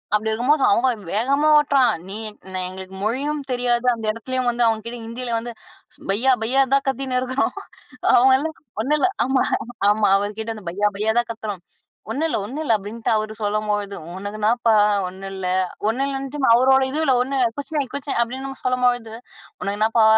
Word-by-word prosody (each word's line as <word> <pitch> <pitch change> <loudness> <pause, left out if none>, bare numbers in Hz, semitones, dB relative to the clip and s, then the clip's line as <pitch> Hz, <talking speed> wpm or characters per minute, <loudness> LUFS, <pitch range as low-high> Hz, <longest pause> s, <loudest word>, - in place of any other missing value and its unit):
அப்டி 220 +1 0
இருக்கும்போது. 260 +6 +2
அவங்க, 235 +6 +3 0.3
வேகமா 275 +7 +2
ஓட்டுறான். 280 -4 +3 0.2
நீ 195 - -6
எ - - -10 0.2
என் - - -6
எங்களுக்கு 190 +1 -8
மொழியும் 285 +7 -1
தெரியாது, 245 0 +1
அந்த 225 - -7
இடத்துலேயும் 250 +2 -2
வந்து 240 0 +2
அவங்க 220 -1 0
கிட்ட 240 +1 -6
ஹிந்தியில 235 +1 -3
வந்து, 240 +1 -6 0.6
பையா 245 +7 +4
பையா 260 +4 +4
தான் 275 0 +3
கத்தின்னு 265 -1 -1
இருக்கிறோம். 255 +2 -1 0.6
அவங்க 260 +2 +6
எல்லாம், 315 +3 -4 0.3
ஒண்ணும் 295 +6 +1
இல்ல. 375 - +4 0.2
ஆமா, 265 +1 +2 0.5
ஆமா, 210 0 +3
அவர் 205 +1 -3
கிட்ட 225 0 -4
அந்த 215 - -11
பையா 205 +3 +1
பையா 220 +2 +1
தான் 240 - -2
கத்துறோம். 210 -4 -6 0.5
ஒண்ணுல 320 +3 -1
ஒண்ணுல, 280 +5 -5
அப்டின்ட்டு 210 +3 -4
அவர் 215 0 -1
சொல்லும்பொழுதும், 205 -4 -2
உனக்கு 205 +2 -6
என்னப்பா 230 +1 +2 0.3
ஒண்ணும் 190 +2 -8
இல்ல. 185 -1 -3 0.4
ஒண்ணும் 265 +5 0
இல்லன்னுட்டு, 275 +1 -4 0.2
அவரோட 265 +2 +5
இதுல, 300 -2 +1
ஒண்ணு 270 +2 -3 0.2
குச்நஹி 285 0 -2
குச்நஹி 280 -2 -2
அப்டின்னு 265 +3 -5
சொல்லும்பொழுது, 245 -3 +1 0.5
உனக்கு 200 +1 -2
என்னப்பா 220 +1 +3
240 Hz, 165 wpm, -21 LUFS, 215-270 Hz, 0.6 s, அவங்க